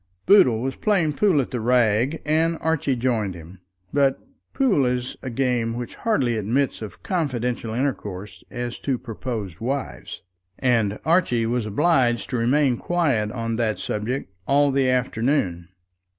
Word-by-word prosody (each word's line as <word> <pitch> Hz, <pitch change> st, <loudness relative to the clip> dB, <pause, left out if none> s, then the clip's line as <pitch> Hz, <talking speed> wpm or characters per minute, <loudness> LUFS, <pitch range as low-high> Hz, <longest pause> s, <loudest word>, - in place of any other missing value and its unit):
Boodle 130 Hz, -, +5 dB
was 135 Hz, 0 st, -2 dB
playing 180 Hz, -8 st, +1 dB
pool 185 Hz, -1 st, +3 dB
at 130 Hz, -, -6 dB
the 125 Hz, -, -2 dB
Rag, 120 Hz, +4 st, +2 dB
and 160 Hz, +2 st, +2 dB
Archie 160 Hz, -4 st, 0 dB
joined 115 Hz, -6 st, -1 dB
him; 85 Hz, +2 st, -12 dB, 0.3 s
but 140 Hz, -2 st, +3 dB, 0.3 s
pool 245 Hz, -, +2 dB
is 125 Hz, 0 st, -1 dB
a 130 Hz, -, -5 dB
game 120 Hz, -2 st, 0 dB
which 120 Hz, 0 st, -5 dB
hardly 130 Hz, -, 0 dB
admits 115 Hz, +6 st, 0 dB
of 110 Hz, -, -9 dB
confidential 125 Hz, -9 st, -2 dB
intercourse 105 Hz, -7 st, -4 dB
as 120 Hz, -1 st, -5 dB
to 135 Hz, -3 st, -1 dB
proposed 110 Hz, -6 st, -6 dB
wives, 135 Hz, +4 st, -4 dB, 0.3 s
and 115 Hz, -5 st, +1 dB
Archie 160 Hz, -9 st, +2 dB
was 115 Hz, -1 st, -1 dB
obliged 120 Hz, -1 st, +1 dB
to 125 Hz, -, 0 dB
remain 125 Hz, +2 st, +2 dB
quiet 140 Hz, -13 st, 0 dB
on 115 Hz, -1 st, -3 dB
that 110 Hz, -2 st, 0 dB
subject 105 Hz, 0 st, -3 dB
all 145 Hz, +1 st, +4 dB
the 135 Hz, -1 st, +2 dB
afternoon. 115 Hz, -, 0 dB
125 Hz, 145 wpm, -23 LUFS, 115-140 Hz, 0.3 s, Boodle